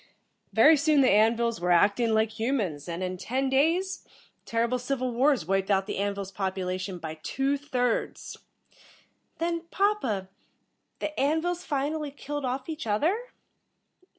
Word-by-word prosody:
Very 315 +1 +6
soon 300 0 +4
the 260 - +5
An 220 +3 +5
vils 235 -3 -1
were 180 - 0
acting 205 +7 +4
like 220 0 +2
humans, 205 - -1
and 170 +2 -3
in 185 0 -3
ten 265 +7 -1
days, 335 +8 +1 0.4
terrible 235 +2 0
civil 255 0 -2
wars 265 - +2
wiped 195 +2 0
out 195 -1 +2
the 200 - -4
An 200 0 0
vils' 195 -1 -6
population 185 -1 -3
by 160 -2 -7
two 270 - 0
thirds." 255 -4 -2 1.0
"Then, 335 0 -2
papa, 390 - 0 0.7
the 305 - -4
An 295 +4 +2
vils 350 +1 -2
finally 295 +2 -2
killed 290 0 -5
off 255 +1 -3
each 315 -6 -5
other?" 255 - +2
250 Hz, 150 wpm, -27 LUFS, 195-290 Hz, 1.0 s, Very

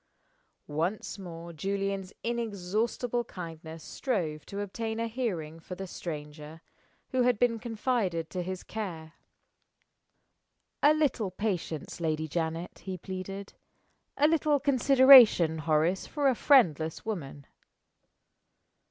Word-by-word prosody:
Once 170 +8 -3
more 170 -2 -8
Julian's 195 +2 -2
inexhaustible 230 +2 -1
kindness 165 -4 -9
strove 170 - -3
to 200 - -6
obtain 220 +3 -4
a 230 - 0
hearing 185 -10 -3
for 180 +3 -8
the 190 +2 -6
stranger 155 -2 -7 0.5
who 260 -2 +1
had 245 -2 +3
been 230 0 +2
confided 220 -7 -1
to 180 - -3
his 185 +1 -5
care. 170 -7 -6 1.7
"A 295 +1 +6
little 275 -9 +1
patience, 180 -7 -3
Lady 155 -1 -1
Janet," 165 +2 -3
he 190 -1 -6
pleaded. 190 +2 -7 0.6
"A 295 - +5
little 305 -2 +2
consideration, 260 - +7
Horace, 160 +4 +1
for 290 -2 0
a - - +3
friendless 165 - +3
woman." 150 -10 -5
190 Hz, 110 wpm, -29 LUFS, 165-235 Hz, 1.7 s, consideration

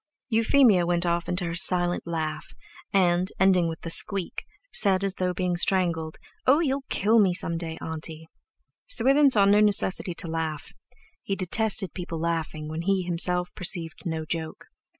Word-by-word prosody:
Euphemia 225 -4 +3
went 175 0 -1
off 170 0 -2
into 180 0 -2
her 165 - -4
silent 175 +1 +1
laugh, 160 -2 -5 0.4
and, 180 -1 +1
ending 185 -3 +3
with 160 - -8
the 165 - -4
squeak, 195 0 +4 0.3
said, 195 -2 +2
as 195 -1 0
though 185 -1 -2
being 180 0 -2
strangled: 170 -3 -1 0.3
"Oh, 275 +4 +5
you'll 275 -4 -2
kill 220 +3 +2
me 190 -4 +2
some 170 -1 0
day, 165 -1 -6
auntie." 160 0 -6 0.6
Swithin 290 - +3
saw 210 -6 +4
no 205 +1 +4
necessity 200 -4 +2
to 170 - -2
laugh; 160 -2 -5 0.5
he 195 - -4
detested 195 +1 0
people 175 -3 -6
laughing 160 -2 -4
when 160 +1 -5
he 190 +1 0
himself 180 0 +3
perceived 170 -3 -4
no 160 -1 -4
joke. 160 0 -6
180 Hz, 160 wpm, -25 LUFS, 165-195 Hz, 0.6 s, Oh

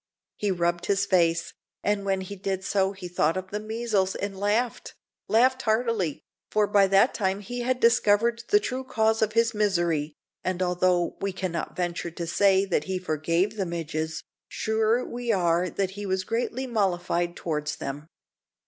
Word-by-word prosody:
He 205 - -1
rubbed 175 -1 0
his 200 0 +2
face, 170 -4 +2 0.3
and 205 -1 +1
when 195 -1 0
he 190 +2 -7
did 190 0 -3
so 195 0 +1
he 190 -2 -8
thought 165 -1 +1
of 185 0 -6
the 210 - -2
measles 215 -3 -1
and 200 -1 -4
laughed 210 +5 -1 0.3
laughed 255 +4 +3
heartily, 220 - 0 0.3
for 210 -1 +3
by 200 -1 +4
that 195 +6 +4
time 195 -2 0
he 245 +4 -6
had 250 +1 0
discovered 230 0 +3
the 415 - +6
true 260 -9 -3
cause 220 -3 +1
of 215 -1 +1
his 230 0 +3
misery; 170 -8 0 0.3
and 185 0 -1
although 180 -1 +1
we 195 - -1
cannot 180 -3 -4
venture 175 -1 -2
to 170 +1 -5
say 195 +3 +3
that 190 - 0
he 190 -1 -2
forgave 170 +4 0
the 195 - 0
midges, 160 -2 -3 0.2
sure 220 +2 +1
we 240 -1 -2
are 175 -2 +2
that 195 -1 -2
he 205 +1 -6
was 190 0 0
greatly 240 +5 -2
mollified 175 -6 0
towards 150 -2 -3
them. 145 +3 -6
195 Hz, 170 wpm, -26 LUFS, 175-220 Hz, 0.3 s, the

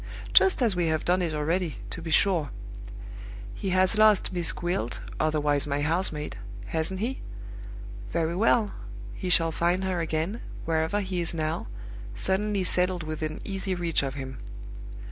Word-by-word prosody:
Just 375 -8 +6
as 220 -6 +2
we 175 -2 +1
have 155 -1 0
done 180 +1 +3
it 165 -3 -1
already, 160 0 -1
to - - -5
be 165 - -6
sure. 165 -2 +3 1.0
He 195 - -4
has 185 +3 +3
lost 215 -3 +5
'Miss 175 -2 +1
Gwilt' 175 -10 -2 0.2
(otherwise 150 -2 +1
my 145 0 -1
house 170 +5 +2
maid), 150 -7 -5 0.3
hasn't 160 - -2
he? 255 +4 -2 0.9
Very 165 0 0
well. 215 +1 +3 0.4
He 180 - -4
shall 165 -2 +4
find 175 +4 +1
her 185 -2 -1
again, 165 +7 -2 0.2
wherever 160 +5 +1
he 185 -2 -2
is 170 0 -1
now, 155 -5 -2 0.5
suddenly 195 - 0
settled 180 -1 +3
within 155 0 -4
easy 195 -1 -2
reach 170 -2 +1
of 135 -1 -3
him. 130 -3 -6
170 Hz, 155 wpm, -27 LUFS, 155-190 Hz, 1.0 s, Just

